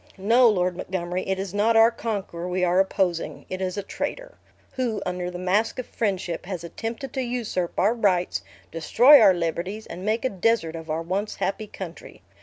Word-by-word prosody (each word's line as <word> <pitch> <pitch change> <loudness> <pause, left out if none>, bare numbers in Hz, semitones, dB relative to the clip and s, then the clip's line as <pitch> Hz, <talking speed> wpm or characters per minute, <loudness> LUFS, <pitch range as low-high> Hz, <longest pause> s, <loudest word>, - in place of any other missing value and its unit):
"No, 230 +5 +5
Lord 180 -3 +1
Montgomery, 180 0 -3
it 190 0 0
is 195 -1 -5
not 220 +3 +3
our 225 +1 +7
conqueror 200 -7 -4
we 180 0 -1
are 180 +1 +3
opposing; 190 -3 0
it 185 0 -4
is 185 +1 -2
a 200 - -2
traitor, - - -5 0.3
who, 240 -5 -2
under 180 -1 -3
the 180 - -6
mask 190 +5 0
of 255 - -4
friendship, 185 -6 -3
has 185 -4 -5
attempted 225 - -6
to 265 - -1
usurp 235 -8 -2
our 205 +5 +4
rights, 190 -6 +1 0.3
destroy 245 - +6
our 195 -4 +7
liberties, 175 +5 -3
and 180 - -8
make 220 +4 0
a - - +2
desert 195 -4 0
of 165 0 -8
our 160 +2 -1
once 195 +5 -2
happy 210 +2 -2
country. 180 -4 -9
190 Hz, 190 wpm, -25 LUFS, 180-225 Hz, 0.3 s, our